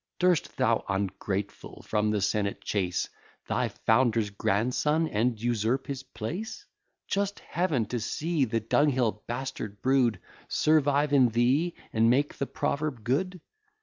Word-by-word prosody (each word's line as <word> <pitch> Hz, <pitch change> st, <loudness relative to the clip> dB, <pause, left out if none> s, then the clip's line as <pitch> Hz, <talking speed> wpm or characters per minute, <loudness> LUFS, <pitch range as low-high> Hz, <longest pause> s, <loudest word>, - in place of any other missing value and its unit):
Durst 180 Hz, -3 st, +1 dB
thou, -, -, +2 dB
ungrateful, 100 Hz, +1 st, -3 dB
from 105 Hz, 0 st, +1 dB
the 105 Hz, -1 st, 0 dB
senate 100 Hz, 0 st, -1 dB
chase 95 Hz, -4 st, -1 dB, 0.4 s
Thy -, -, +1 dB
founder's 110 Hz, -2 st, +2 dB
grandson, 125 Hz, +11 st, +1 dB
and 115 Hz, -2 st, 0 dB
usurp 120 Hz, +3 st, 0 dB
his 135 Hz, -2 st, -4 dB
place? 170 Hz, -, -6 dB, 0.4 s
Just 200 Hz, 0 st, -1 dB
Heaven! 155 Hz, -9 st, 0 dB
to 120 Hz, +3 st, -3 dB
see 155 Hz, +6 st, 0 dB
the 115 Hz, -1 st, -1 dB
dunghill 125 Hz, -2 st, +2 dB
bastard 120 Hz, -4 st, -5 dB
brood 130 Hz, -6 st, +3 dB, 0.3 s
Survive 145 Hz, -1 st, +2 dB
in 130 Hz, -4 st, +6 dB
thee, 130 Hz, +9 st, +2 dB, 0.2 s
and 115 Hz, +1 st, +4 dB
make 140 Hz, +4 st, +1 dB
the 140 Hz, -, -1 dB
proverb 140 Hz, -6 st, -2 dB
good? 180 Hz, -, -1 dB
125 Hz, 130 wpm, -28 LUFS, 110-145 Hz, 0.4 s, in